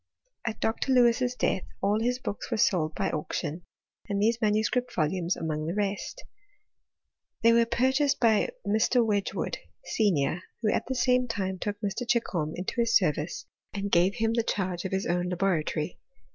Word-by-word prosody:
At 220 -1 -3
Dr. 230 +4 0
Lewis's 245 0 +3
death, 190 - 0 0.2
all 205 +2 +1
his 245 +2 0
booki 210 -5 -5
were 230 - -1
sold 175 -8 +2
by - - -1
auction, 155 +1 -3 0.5
and 200 0 0
these 225 +2 +2
manuscript 220 +4 +1
volumtli 170 +3 0
among 155 -1 -3
the 170 - -2
rest. 205 - -3 1.2
They 230 0 +6
were 230 0 +4
purchased 265 +4 +2
by 225 - +3 0.2
Mr. 225 +3 +3
Wedtfji* 205 -2 0
wood, - - -2 0.3
senior, 180 -6 +1 0.2
who 215 - +3
at - - -1
the 260 - -2
same 250 0 +2
time 190 -5 -3
took 205 +1 -3
Mr. 210 +3 -2
Chichdtti 185 -10 0
into 185 +6 -2
his 230 0 +5
service, 160 -3 -2 0.3
ahd 200 0 -3
gave 180 +3 +4
him 225 -1 +1
the 230 - +2
charge 185 -5 -2
of 190 - -3
his 190 0 -1
oifii 175 +1 0
♦kfibW 190 -1 +2
lit 155 - -3
cterfhtRY. 155 +2 -3
210 Hz, 175 wpm, -28 LUFS, 180-235 Hz, 1.2 s, They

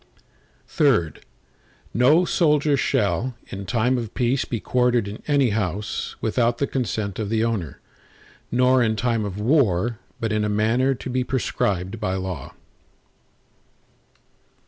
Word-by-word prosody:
III 110 - +4 0.8
No 150 +9 +4
soldier 150 -4 +2
shall, 125 0 0
in 100 0 -7
time 125 +2 +1
of 115 -2 -7
peace 125 +1 +1
be 115 - -3
quartered 125 -2 +1
in 100 +2 -7
any 140 -5 +3
house, 105 0 -3
without 115 +1 +1
the 140 - +1
consent 110 -7 -3
of 105 -2 -2
the 110 0 +1
owner, 105 - -2 0.7
nor 125 +1 +4
in 110 -2 +2
time 115 -1 0
of 100 0 -5
war, 115 - +2 0.2
but 115 -1 -2
in 105 0 +1
a 105 - 0
manner 115 +6 +2
to 125 - -8
be 130 0 0
prescribed 100 -5 -1
by 95 -4 -1
law. 95 -6 -5
115 Hz, 135 wpm, -23 LUFS, 105-130 Hz, 0.8 s, III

